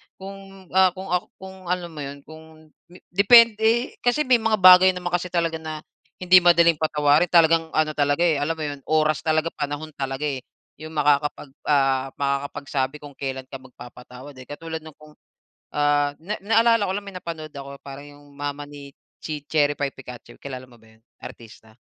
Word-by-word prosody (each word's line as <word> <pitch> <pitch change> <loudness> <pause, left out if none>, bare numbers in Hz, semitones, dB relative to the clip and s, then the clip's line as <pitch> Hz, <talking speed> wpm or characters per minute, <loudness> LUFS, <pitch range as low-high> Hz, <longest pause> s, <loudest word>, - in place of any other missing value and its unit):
kung, 195 -1 -12
ah, 185 -1 +3
kung, 190 -1 -8
ak 180 0 +1
kung 190 -1 -12
alam 175 -1 -3
mo 155 - -10
yun, 140 0 -8
kung 155 0 -16 0.4
depende. 225 +4 +4
Kasi 245 +5 +1
may 250 -3 +3
mga 220 0 +1
bagay 185 0 +8
naman 175 -1 -5
kasi 175 +1 -1
talaga 165 -2 -1
na 155 -1 -7 0.4
hindi 180 0 +7
madaling 170 -2 +4
patawarin 150 +1 +2
talagang 165 -1 +4
ano 155 0 +2
talaga 145 +2 0
eh, 160 -4 +2
alam 160 +3 -1
mo 155 - -6
yun, 145 -1 -5
oras 155 -1 +1
talaga 160 +1 0
panahon 145 +2 -4
talaga 135 0 -5
eh, 140 -3 -2 0.4
yung 155 0 -10
makakapag 150 -1 0 0.2
ah 135 -2 +2
makakapagsabi 140 0 -3
kung 145 - -10
kailan 135 -1 -5
ka 135 0 -10
magpapatawad 125 +1 -13
eh. 130 - -12
Katulad 160 +2 -7
ng 155 -2 -14
kung, 155 0 -17 0.6
ah, 145 0 +2
na 200 +6 -5
naalala 225 0 +3
ko 190 - -2
lang 205 - -4
may 195 - -9
napanood 160 -3 -7
ako 140 0 -8
parang 140 +1 -10
yung 145 - -19
mama 145 0 -5
ni 140 -1 -12 0.3
chi 150 -2 -5
Cherry 145 -2 +2
Pie 140 0 -2
Picache 125 -3 -12
kilala 130 -2 -8
mo 120 - -18
ba 110 0 -21
yun, - - -35 0.2
artista? 110 -1 -13
155 Hz, 180 wpm, -23 LUFS, 140-180 Hz, 0.6 s, bagay